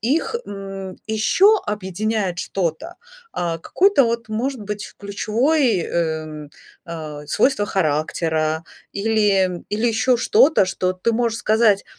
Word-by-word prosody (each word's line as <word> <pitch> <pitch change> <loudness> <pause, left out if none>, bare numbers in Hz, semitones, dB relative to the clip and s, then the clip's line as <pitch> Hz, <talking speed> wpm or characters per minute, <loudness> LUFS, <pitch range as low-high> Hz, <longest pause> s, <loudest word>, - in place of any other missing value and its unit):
их, 290 - 0
м, 195 -1 -7
еще 375 - +4
объединяет 205 -1 -2
что-то? 185 - -3 0.4
А, 170 -2 -2
какое-то 370 - +3
вот, 230 -1 -2
может 245 +3 -2
быть, 205 0 -6
ключевой, 225 - +1
эм, 155 -3 -3 0.4
а, 155 -3 -7
свойство 205 - +2
характера 160 -1 0 0.3
или, 215 +1 +1 0.2
м, 180 -1 -7
или 220 +3 0
ещё 230 +2 +2
что-то, 320 - +4
что 185 0 -1
ты 205 +6 0
можешь 230 -1 0
сказать: 215 -3 +3
205 Hz, 120 wpm, -21 LUFS, 175-235 Hz, 0.4 s, еще